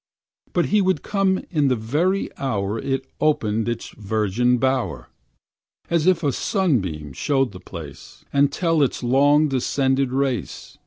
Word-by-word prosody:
But 175 - +2
he 210 - +5
would 185 -6 +1
come 195 -2 +1
in 150 -5 +2
the 130 - +2
very 150 - -1
hour 105 -5 -2
It 135 +2 -2
opened 115 -8 +1
in 120 - +2
its - - -10
virgin 110 +3 0
bower, 130 0 -1 0.8
As 170 0 +2
if 180 -2 +3
a 145 - +2
sunbeam 95 - -1
showed 135 - 0
the 90 - -10
place, 80 -6 -11
And 140 0 +3
tell 165 0 +1
its 135 - 0
long 145 +5 +4
descended 135 0 0
race. 135 -2 -3
135 Hz, 150 wpm, -22 LUFS, 110-155 Hz, 0.8 s, he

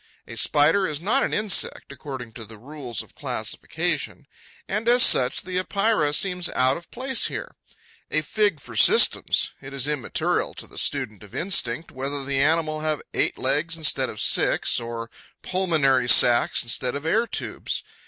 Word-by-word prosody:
A - - -8
Spider 185 +7 +3
is 150 -2 -3
not 225 +11 +1
an - - 0
insect, 210 -3 0
according 130 -5 -8
to 115 - -9
the 110 0 -11
rules 130 -1 -6
of - - -21
classification; - - -3 0.4
and 215 +4 -1
as 245 0 +5
such 125 -1 +3
the 185 0 -2
Epeira 200 -5 +1
seems 180 +2 0
out 130 +1 +3
of 170 - -10
place 260 -1 0
here. - - -6 0.6
A 155 - +1
fig 200 +3 0
for - - -11
systems! - - +3
It 135 +1 -9
is 135 0 -1
immaterial 150 -5 -1
to - - -7
the - - -6
student 130 -8 -1
of 105 -2 -13
instinct 165 -5 0
whether 135 +1 -4
the 135 0 -1
animal 155 +1 +1
have 155 -1 -2
eight - - 0
legs 155 +5 -1
instead 140 -5 +1
of 105 - -8
six, - - +2
or 115 -1 -6 0.3
pulmonary 150 -9 +2
sacs 120 0 +5
instead 125 +2 -2
of 140 +2 -5
air 225 +8 +2
tubes. - - -4
150 Hz, 165 wpm, -24 LUFS, 130-180 Hz, 0.6 s, as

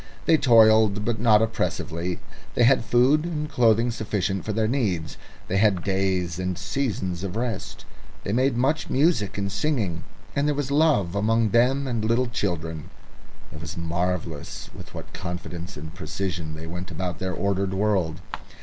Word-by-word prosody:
They 165 - +5
toiled, 110 -6 +5
but 115 -2 -1
not 110 -1 +5
oppressively; 90 -5 -2 0.4
they 120 - +4
had 120 - +5
food 125 +7 +3
and 155 -3 -3
clothing 120 -3 +3
sufficient 100 -4 -2
for 110 - -1
their 110 +1 +1
needs; 100 - -1 0.3
they 95 - 0
had 95 -3 +3
days 95 -3 0
and 90 -1 -2
seasons 95 -6 -2
of 95 -1 -4
rest; 115 -3 -4 0.4
they 100 - -2
made 130 +1 +2
much 150 +6 +1
of - - -14
music 135 - +2
and 100 -1 -2
singing, 105 - -1 0.3
and 140 +1 +1
there 150 - +1
was 140 -1 -2
love 140 - +3
among 110 +1 +2
them, 130 +4 +3
and 120 -4 -2
little 115 +3 +2
children. 85 - -3 0.6
It 75 - -9
was 80 +2 -7
marvellous 85 -2 -3
with - - -11
what - - -9
confidence 90 0 -6
and 80 +2 -8
precision 90 -4 -4
they 80 +1 -7
went 90 +2 -6
about 90 -1 -4
their 95 -1 -2
ordered 100 -1 -1
world. 95 -6 0
100 Hz, 165 wpm, -25 LUFS, 90-120 Hz, 0.6 s, They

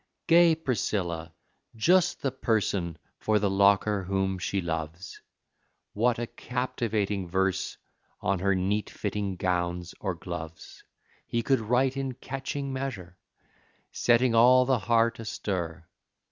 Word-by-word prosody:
Gay 170 -1 +6
Priscilla 95 - -2 0.4
just 175 +10 +3
the 135 - +1
person 100 -8 -1 0.2
For 110 0 +2
the 100 -1 +1
Locker 100 +1 +3
whom 95 0 -1
she 95 +2 -1
loves; 80 +1 -5 0.7
What 115 +3 +2
a 120 - -2
captivating 110 -6 -2
verse 95 +1 0 0.4
on 95 -1 0
Her 100 +1 +2
neat 100 +3 0
fitting 100 -2 -3
gowns 90 -1 -1
or 95 -3 -2
gloves 80 -1 -8 0.4
He 115 0 -1
could 135 +1 +2
write 125 +4 +1
in 135 -2 -3
catching 135 +1 -4
measure, 100 -10 -5 0.7
Setting 120 0 +3
all 125 +2 +6
the 130 -2 +2
heart 115 +2 +2
astir! 90 -7 -4
105 Hz, 120 wpm, -28 LUFS, 90-125 Hz, 0.7 s, Gay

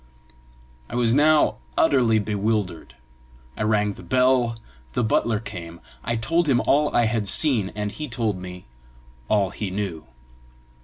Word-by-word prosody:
I - - -6
was 120 -2 +2
now 150 +2 +4 0.2
utterly 120 -5 +4
bewildered. 105 - -2 0.6
I - - -6
rang 105 -1 +1
the - - -13
bell; 125 -2 +2 0.4
the - - 0
butler 110 0 +1
came; 85 -6 -8 0.2
I 115 - -1
told 165 +9 0
him 125 -3 +4
all 145 +2 +2
I 120 - +4
had 110 -2 -1
seen, 115 -4 +2
and 105 -1 -3
he 155 +6 -6
told 115 -4 -1
me 90 0 -9 0.6
all 100 -3 +2
he 105 - -4
knew. 95 -7 -4
110 Hz, 145 wpm, -23 LUFS, 100-125 Hz, 0.6 s, now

